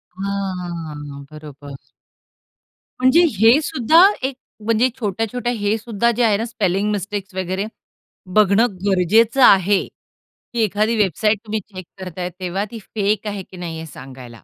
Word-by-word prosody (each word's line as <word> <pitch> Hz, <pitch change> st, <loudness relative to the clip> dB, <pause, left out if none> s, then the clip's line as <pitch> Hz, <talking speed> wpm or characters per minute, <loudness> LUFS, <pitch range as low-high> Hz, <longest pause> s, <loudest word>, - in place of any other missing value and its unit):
हां, 175 Hz, -7 st, -5 dB
बरोबर. 145 Hz, -2 st, -11 dB, 1.2 s
म्हणजे 260 Hz, +7 st, +5 dB, 0.2 s
हे 230 Hz, +7 st, +6 dB
सुद्धा 310 Hz, +2 st, +3 dB, 0.2 s
एक 265 Hz, -1 st, -3 dB, 0.3 s
म्हणजे 230 Hz, +3 st, +3 dB
छोट्या-छोट्या 225 Hz, +3 st, -2 dB
हे 210 Hz, 0 st, 0 dB
सुद्धा 235 Hz, +1 st, 0 dB
जे 240 Hz, +1 st, 0 dB
आहे 210 Hz, -3 st, +3 dB
ना, 225 Hz, -, -2 dB
स्पेलिंग 205 Hz, -3 st, -1 dB
मिस्टेक्स 200 Hz, -1 st, -4 dB
वगैरे 190 Hz, +2 st, -2 dB, 0.7 s
बघणं 215 Hz, +2 st, +5 dB, 0.2 s
गरजेचं 215 Hz, +7 st, +3 dB
आहे, 195 Hz, +1 st, +5 dB, 0.7 s
की 235 Hz, -, -2 dB
एखादी 215 Hz, +3 st, +1 dB
वेबसाईट 210 Hz, +2 st, +1 dB
तुम्ही 215 Hz, 0 st, -2 dB
चेक 185 Hz, -3 st, -11 dB
करताय, 180 Hz, -1 st, -5 dB
तेव्हा 185 Hz, +3 st, -2 dB
ती 230 Hz, -, -7 dB
फेक 210 Hz, 0 st, -2 dB
आहे 200 Hz, -2 st, -4 dB
की 185 Hz, -, -14 dB
नाही 165 Hz, -2 st, -6 dB
हे 160 Hz, -, -7 dB
सांगायला. 130 Hz, -3 st, -11 dB
200 Hz, 135 wpm, -20 LUFS, 180-225 Hz, 1.2 s, हे